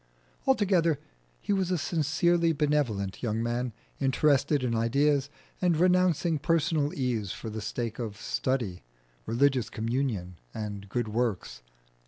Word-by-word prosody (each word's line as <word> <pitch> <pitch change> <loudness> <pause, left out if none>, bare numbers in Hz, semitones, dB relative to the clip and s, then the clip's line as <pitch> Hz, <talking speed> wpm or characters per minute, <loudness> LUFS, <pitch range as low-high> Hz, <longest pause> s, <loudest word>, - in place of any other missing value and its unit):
Altogether, 185 - +3 0.4
he - - 0
was 190 -2 +1
a 180 - +1
sincerely 165 +2 +2
benevolent 140 -11 0
young 115 -1 -1
man, 120 +1 -1 0.3
interested 140 +1 +2
in 120 -2 0
ideas, 140 +5 +2 0.3
and 175 -3 +3
renouncing 180 -2 +3
personal 155 -2 +1
ease 120 -7 -1
for 110 - -6
the 110 0 -5
sake 115 +2 -4
of 110 -4 -4
study, 115 - -2 0.5
religious 130 -1 +2
communion, 110 - -2 0.2
and 100 -2 -5
good 120 +3 -1
works. 105 - -2
130 Hz, 125 wpm, -28 LUFS, 110-155 Hz, 0.5 s, Altogether